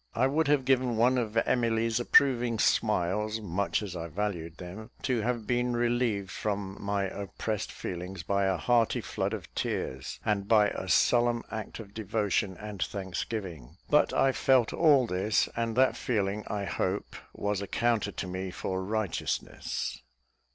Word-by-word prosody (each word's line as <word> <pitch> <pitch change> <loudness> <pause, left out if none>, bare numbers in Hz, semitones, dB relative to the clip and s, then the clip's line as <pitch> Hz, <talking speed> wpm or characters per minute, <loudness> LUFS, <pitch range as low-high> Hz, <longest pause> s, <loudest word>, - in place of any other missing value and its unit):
I 120 - +3
would 145 +3 +2
have 145 -3 +3
given 125 -3 +2
one 125 +3 +4
of 115 -2 -2
Emily's 115 -1 +2
approving 120 -2 +4
smiles, 105 +1 +1
much 100 +1 -1
as 95 -3 -6
I 85 -1 -4
valued 85 -2 -3
them, 95 +5 -8
to 125 -4 +1
have 120 0 -1
been 120 0 0
relieved 120 -5 0
from 100 -2 -3
my 100 0 0
oppressed 100 +2 -4
feelings 90 0 -6
by 100 +2 +1
a 95 -1 +1
hearty 120 +3 +2
flood - - -2
of - - -6
tears, 65 0 -3
and 100 -2 0
by 105 -2 +5
a 95 - -5
solemn 120 +3 +3
act 110 0 -5
of 100 -3 -10
devotion 105 -3 -1
and 105 -3 -7
thanksgiving; 90 - -4
but 150 - +5
I 135 - +3
felt 130 -3 +3
all 145 -5 +5
this, 100 +1 +1
and 115 -1 -1
that 130 +1 +4
feeling, 105 -3 -1
I 105 -1 -2
hope, 95 +2 -2 0.2
was 100 -1 -2
accounted 110 0 0
to 95 - -3
me 95 +1 -4
for 95 +1 -3
righteousness. 105 -1 -3
105 Hz, 155 wpm, -29 LUFS, 95-120 Hz, 0.2 s, by